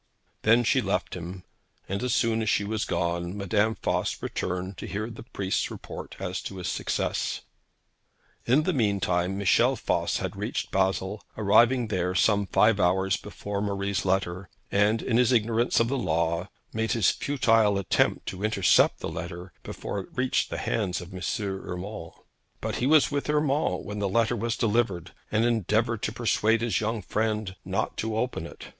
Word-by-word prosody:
Then 115 +2 +5
she 130 +3 +3
left 100 -3 -1
him, 90 +1 -7 0.4
and 100 +3 -2
as 125 0 -1
soon 115 -1 +2
as 110 - 0
she 100 - +2
was 110 +1 -2
gone, 85 +2 -2
Madame 105 +3 +1
Voss - - 0
returned 90 +1 -3
to - - -6
hear 110 +3 -3
the 115 - -9
priest's 100 -5 -2
report - - -8
as 95 -1 -3
to 95 - -7
his 90 - -4
success. - - -1 1.1
In 135 +6 +4
the - - +1
mean 105 -6 +1
time, 90 +1 0
Michel 115 +6 +3
Voss - - 0
had - - -4
reached - - -3
Basle, 95 +1 0
arriving 115 +3 +4
there 90 -2 -1
some 100 0 +3
five 105 +1 +4
hours 95 +1 +2
before 100 0 -5
Marie's 100 -1 -1
letter, 95 -1 -1 0.2
and, 105 +3 +2
in 115 - +1
his 125 0 +4
ignorance 115 0 +2
of 115 - +3
the 135 +2 -1
law, 85 -4 +1
had - - -22 0.2
made 110 0 0
his 115 -5 +4
futile 115 -7 +2
attempt 100 - +1
to 95 +2 -7
intercept 105 -4 +3
the - - -3
letter 90 +1 -6
before 100 - -5
it 95 - -8
reached 125 0 +1
the - - -4
hands 100 -4 -1
of 90 +1 -10
M. 90 - -7 0.2
Urmand. 95 -1 -5 0.5
But - - -3
he 125 - 0
was 155 0 +5
with 145 0 -2
Urmand 150 0 +1
when 105 0 -5
the 100 -1 0
letter 115 +3 +2
was 115 +1 -2
delivered, 105 -6 0 0.2
and 110 +2 +2
endeavoured 110 0 +1
to - - -1
persuade 115 -1 +1
his 110 -6 0
young 110 -1 -2
friend 110 -3 -1
not - - -2
to 110 0 -2
open 115 -8 -2
it. - - -11
105 Hz, 175 wpm, -27 LUFS, 95-115 Hz, 1.1 s, Then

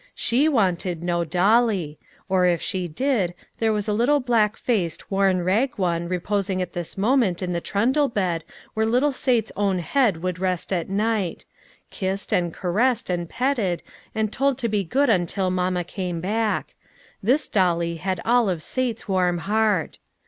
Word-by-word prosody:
She 265 +7 +2
wanted 180 - 0
no 175 -1 0
dolly; 185 -1 +2 0.3
or, 185 -1 +3
if 175 -2 +2
she 185 -2 -2
did, 195 - 0 0.2
there 225 -1 +2
was 210 -1 -1
a 210 - +1
little 250 +7 +3
black 230 -5 +1
faced, 180 -9 -2
worn, 195 -2 +2
rag 220 +9 +1
one 170 -3 -1
reposing 190 +1 -1
at 180 -2 -3
this 175 +1 -5
moment 205 -4 +2
in 180 -1 -2
the 170 - -2
trundle 260 - +1
bed 180 -7 -1 0.3
where 220 0 +1
little 250 +6 +2
Sale's 245 -4 0
own 200 -2 +1
head 190 -2 +1
would 180 -1 -2
rest 185 0 -1
at 175 -1 -2
night; 205 -2 -1 0.5
kissed, 190 +1 -3
and 175 -2 +1
caressed, 215 +6 0
and 175 -2 -2
petted, 235 -9 0 0.3
and 220 -1 -1
told 275 -1 +1
to 245 -3 -1
be 210 -2 0
good 270 - +1
until 185 0 0
mamma 180 -1 0
came 180 -1 -4
back; 215 +5 -1 0.5
this 260 +9 +2
dolly 170 -3 +1
had 185 +1 -2
all 235 -2 +3
of 170 -4 -2
Sale's 250 -3 -2
warm 180 -3 +1
heart. 205 -1 0
195 Hz, 165 wpm, -23 LUFS, 180-230 Hz, 0.5 s, or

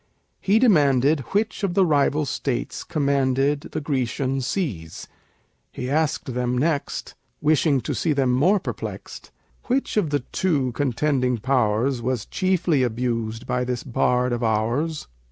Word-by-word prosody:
He 200 +3 +2
demanded 150 - +4
Which 215 +2 -1
of 185 -3 0
the 195 - +5
rival 150 -1 +2
States 135 -2 -3
commanded 140 -1 0
The 155 - -3
Grecian 135 -1 -1
seas? 120 - -4 0.6
He 125 +1 -5
asked 150 -4 0
them 125 0 -1
next 145 +1 -1 0.3
(Wishing 150 -2 +2
to - - -3
see 165 - 0
them 135 -3 +2
more 180 +11 +3
perplexed) - - -7 0.4
Which 255 -2 -1
of 190 -7 +2
the 145 -2 0
two 145 -9 0
contending 125 0 0
powers 120 +1 +1
Was 125 -2 -2
chiefly 180 -6 +1
abused 115 -2 -2
by 125 0 -1
this 125 -1 -3
bard 125 0 +1
of 120 - -2
ours? 120 +9 0
135 Hz, 135 wpm, -23 LUFS, 125-155 Hz, 0.6 s, the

